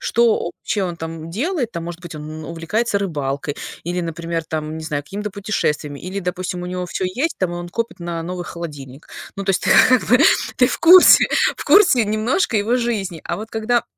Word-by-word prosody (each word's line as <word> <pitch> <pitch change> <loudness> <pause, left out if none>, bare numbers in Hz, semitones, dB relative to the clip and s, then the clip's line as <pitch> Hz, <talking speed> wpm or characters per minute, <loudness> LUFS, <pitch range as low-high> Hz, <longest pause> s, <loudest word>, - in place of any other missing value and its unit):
что 235 -1 +3
вообще 200 +3 -3
он 180 - -1
он 170 - -8
там 165 0 -7
делает. 260 - -2
Там, 170 -1 -5
может 175 0 -7
быть, 175 -4 -9
он 155 +1 -8
увлекается 200 +7 -1
рыбалкой 145 -6 -3 0.3
или, 175 +1 -2
например, 165 0 -3
там, 155 0 -4
не 160 - -7
знаю, 145 -2 -3
какими-то 210 +6 -5
путешествиями, 150 -8 -2
или, 185 +2 -5
допустим, 180 -1 -4
у - - -5
него 180 0 -4
всё 185 - -3
есть, 255 - -2
там, 180 -2 -1
и - - -4
он 175 0 -6
копит 230 +1 -4
на 170 -1 -4
новый 180 0 -5
холодильник. 145 -6 -8 0.3
Ну, 200 - -4
то 195 - +1
есть, 185 - 0
ты, - - 0 0.2
как 255 -2 +4
бы, 250 +2 +5 0.4
ты 250 - +5
в - - -3
курсе 360 +2 +8 0.3
в - - -7
курсе 355 - +5
немножко 215 - 0
его 215 +4 +1
жизни. 205 -8 -2
А - - -3
вот 220 +2 -7
когда 230 +2 0
180 Hz, 210 wpm, -20 LUFS, 165-220 Hz, 0.4 s, курсе